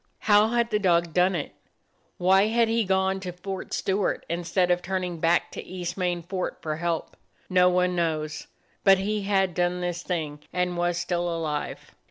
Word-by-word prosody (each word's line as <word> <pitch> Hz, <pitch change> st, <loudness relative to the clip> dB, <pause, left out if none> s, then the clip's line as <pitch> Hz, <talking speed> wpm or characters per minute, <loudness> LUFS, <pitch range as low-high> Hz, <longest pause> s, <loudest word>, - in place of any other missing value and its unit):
How 210 Hz, 0 st, +5 dB
had 235 Hz, 0 st, 0 dB
the 210 Hz, -, +2 dB
dog 170 Hz, -4 st, +2 dB
done 180 Hz, +2 st, +3 dB
it? 150 Hz, -, -3 dB, 0.7 s
Why 190 Hz, +3 st, +4 dB
had 230 Hz, +1 st, +3 dB
he 230 Hz, 0 st, +2 dB
gone 190 Hz, 0 st, +1 dB
to 185 Hz, -2 st, -5 dB
Fort 190 Hz, +2 st, -6 dB
Stewart 195 Hz, 0 st, -1 dB
instead 175 Hz, +2 st, 0 dB
of 175 Hz, 0 st, +2 dB
turning 180 Hz, -2 st, -3 dB
back 170 Hz, +2 st, +2 dB
to -, -, -7 dB
East 180 Hz, -2 st, -5 dB
Main 180 Hz, -2 st, -1 dB
Fort 185 Hz, +1 st, -3 dB
for 155 Hz, -1 st, -3 dB
help? 170 Hz, 0 st, -2 dB, 0.4 s
No 180 Hz, 0 st, +5 dB
one 180 Hz, 0 st, +1 dB
knows, 155 Hz, -3 st, -2 dB, 0.4 s
but 195 Hz, -1 st, +7 dB
he 210 Hz, +2 st, -1 dB
had 195 Hz, -2 st, +1 dB
done 175 Hz, +1 st, 0 dB
this 175 Hz, -1 st, -3 dB
thing 155 Hz, -5 st, -3 dB
and 180 Hz, 0 st, -1 dB
was 175 Hz, 0 st, 0 dB
still 175 Hz, 0 st, -1 dB
alive. 160 Hz, -3 st, -4 dB
180 Hz, 180 wpm, -26 LUFS, 170-190 Hz, 0.7 s, but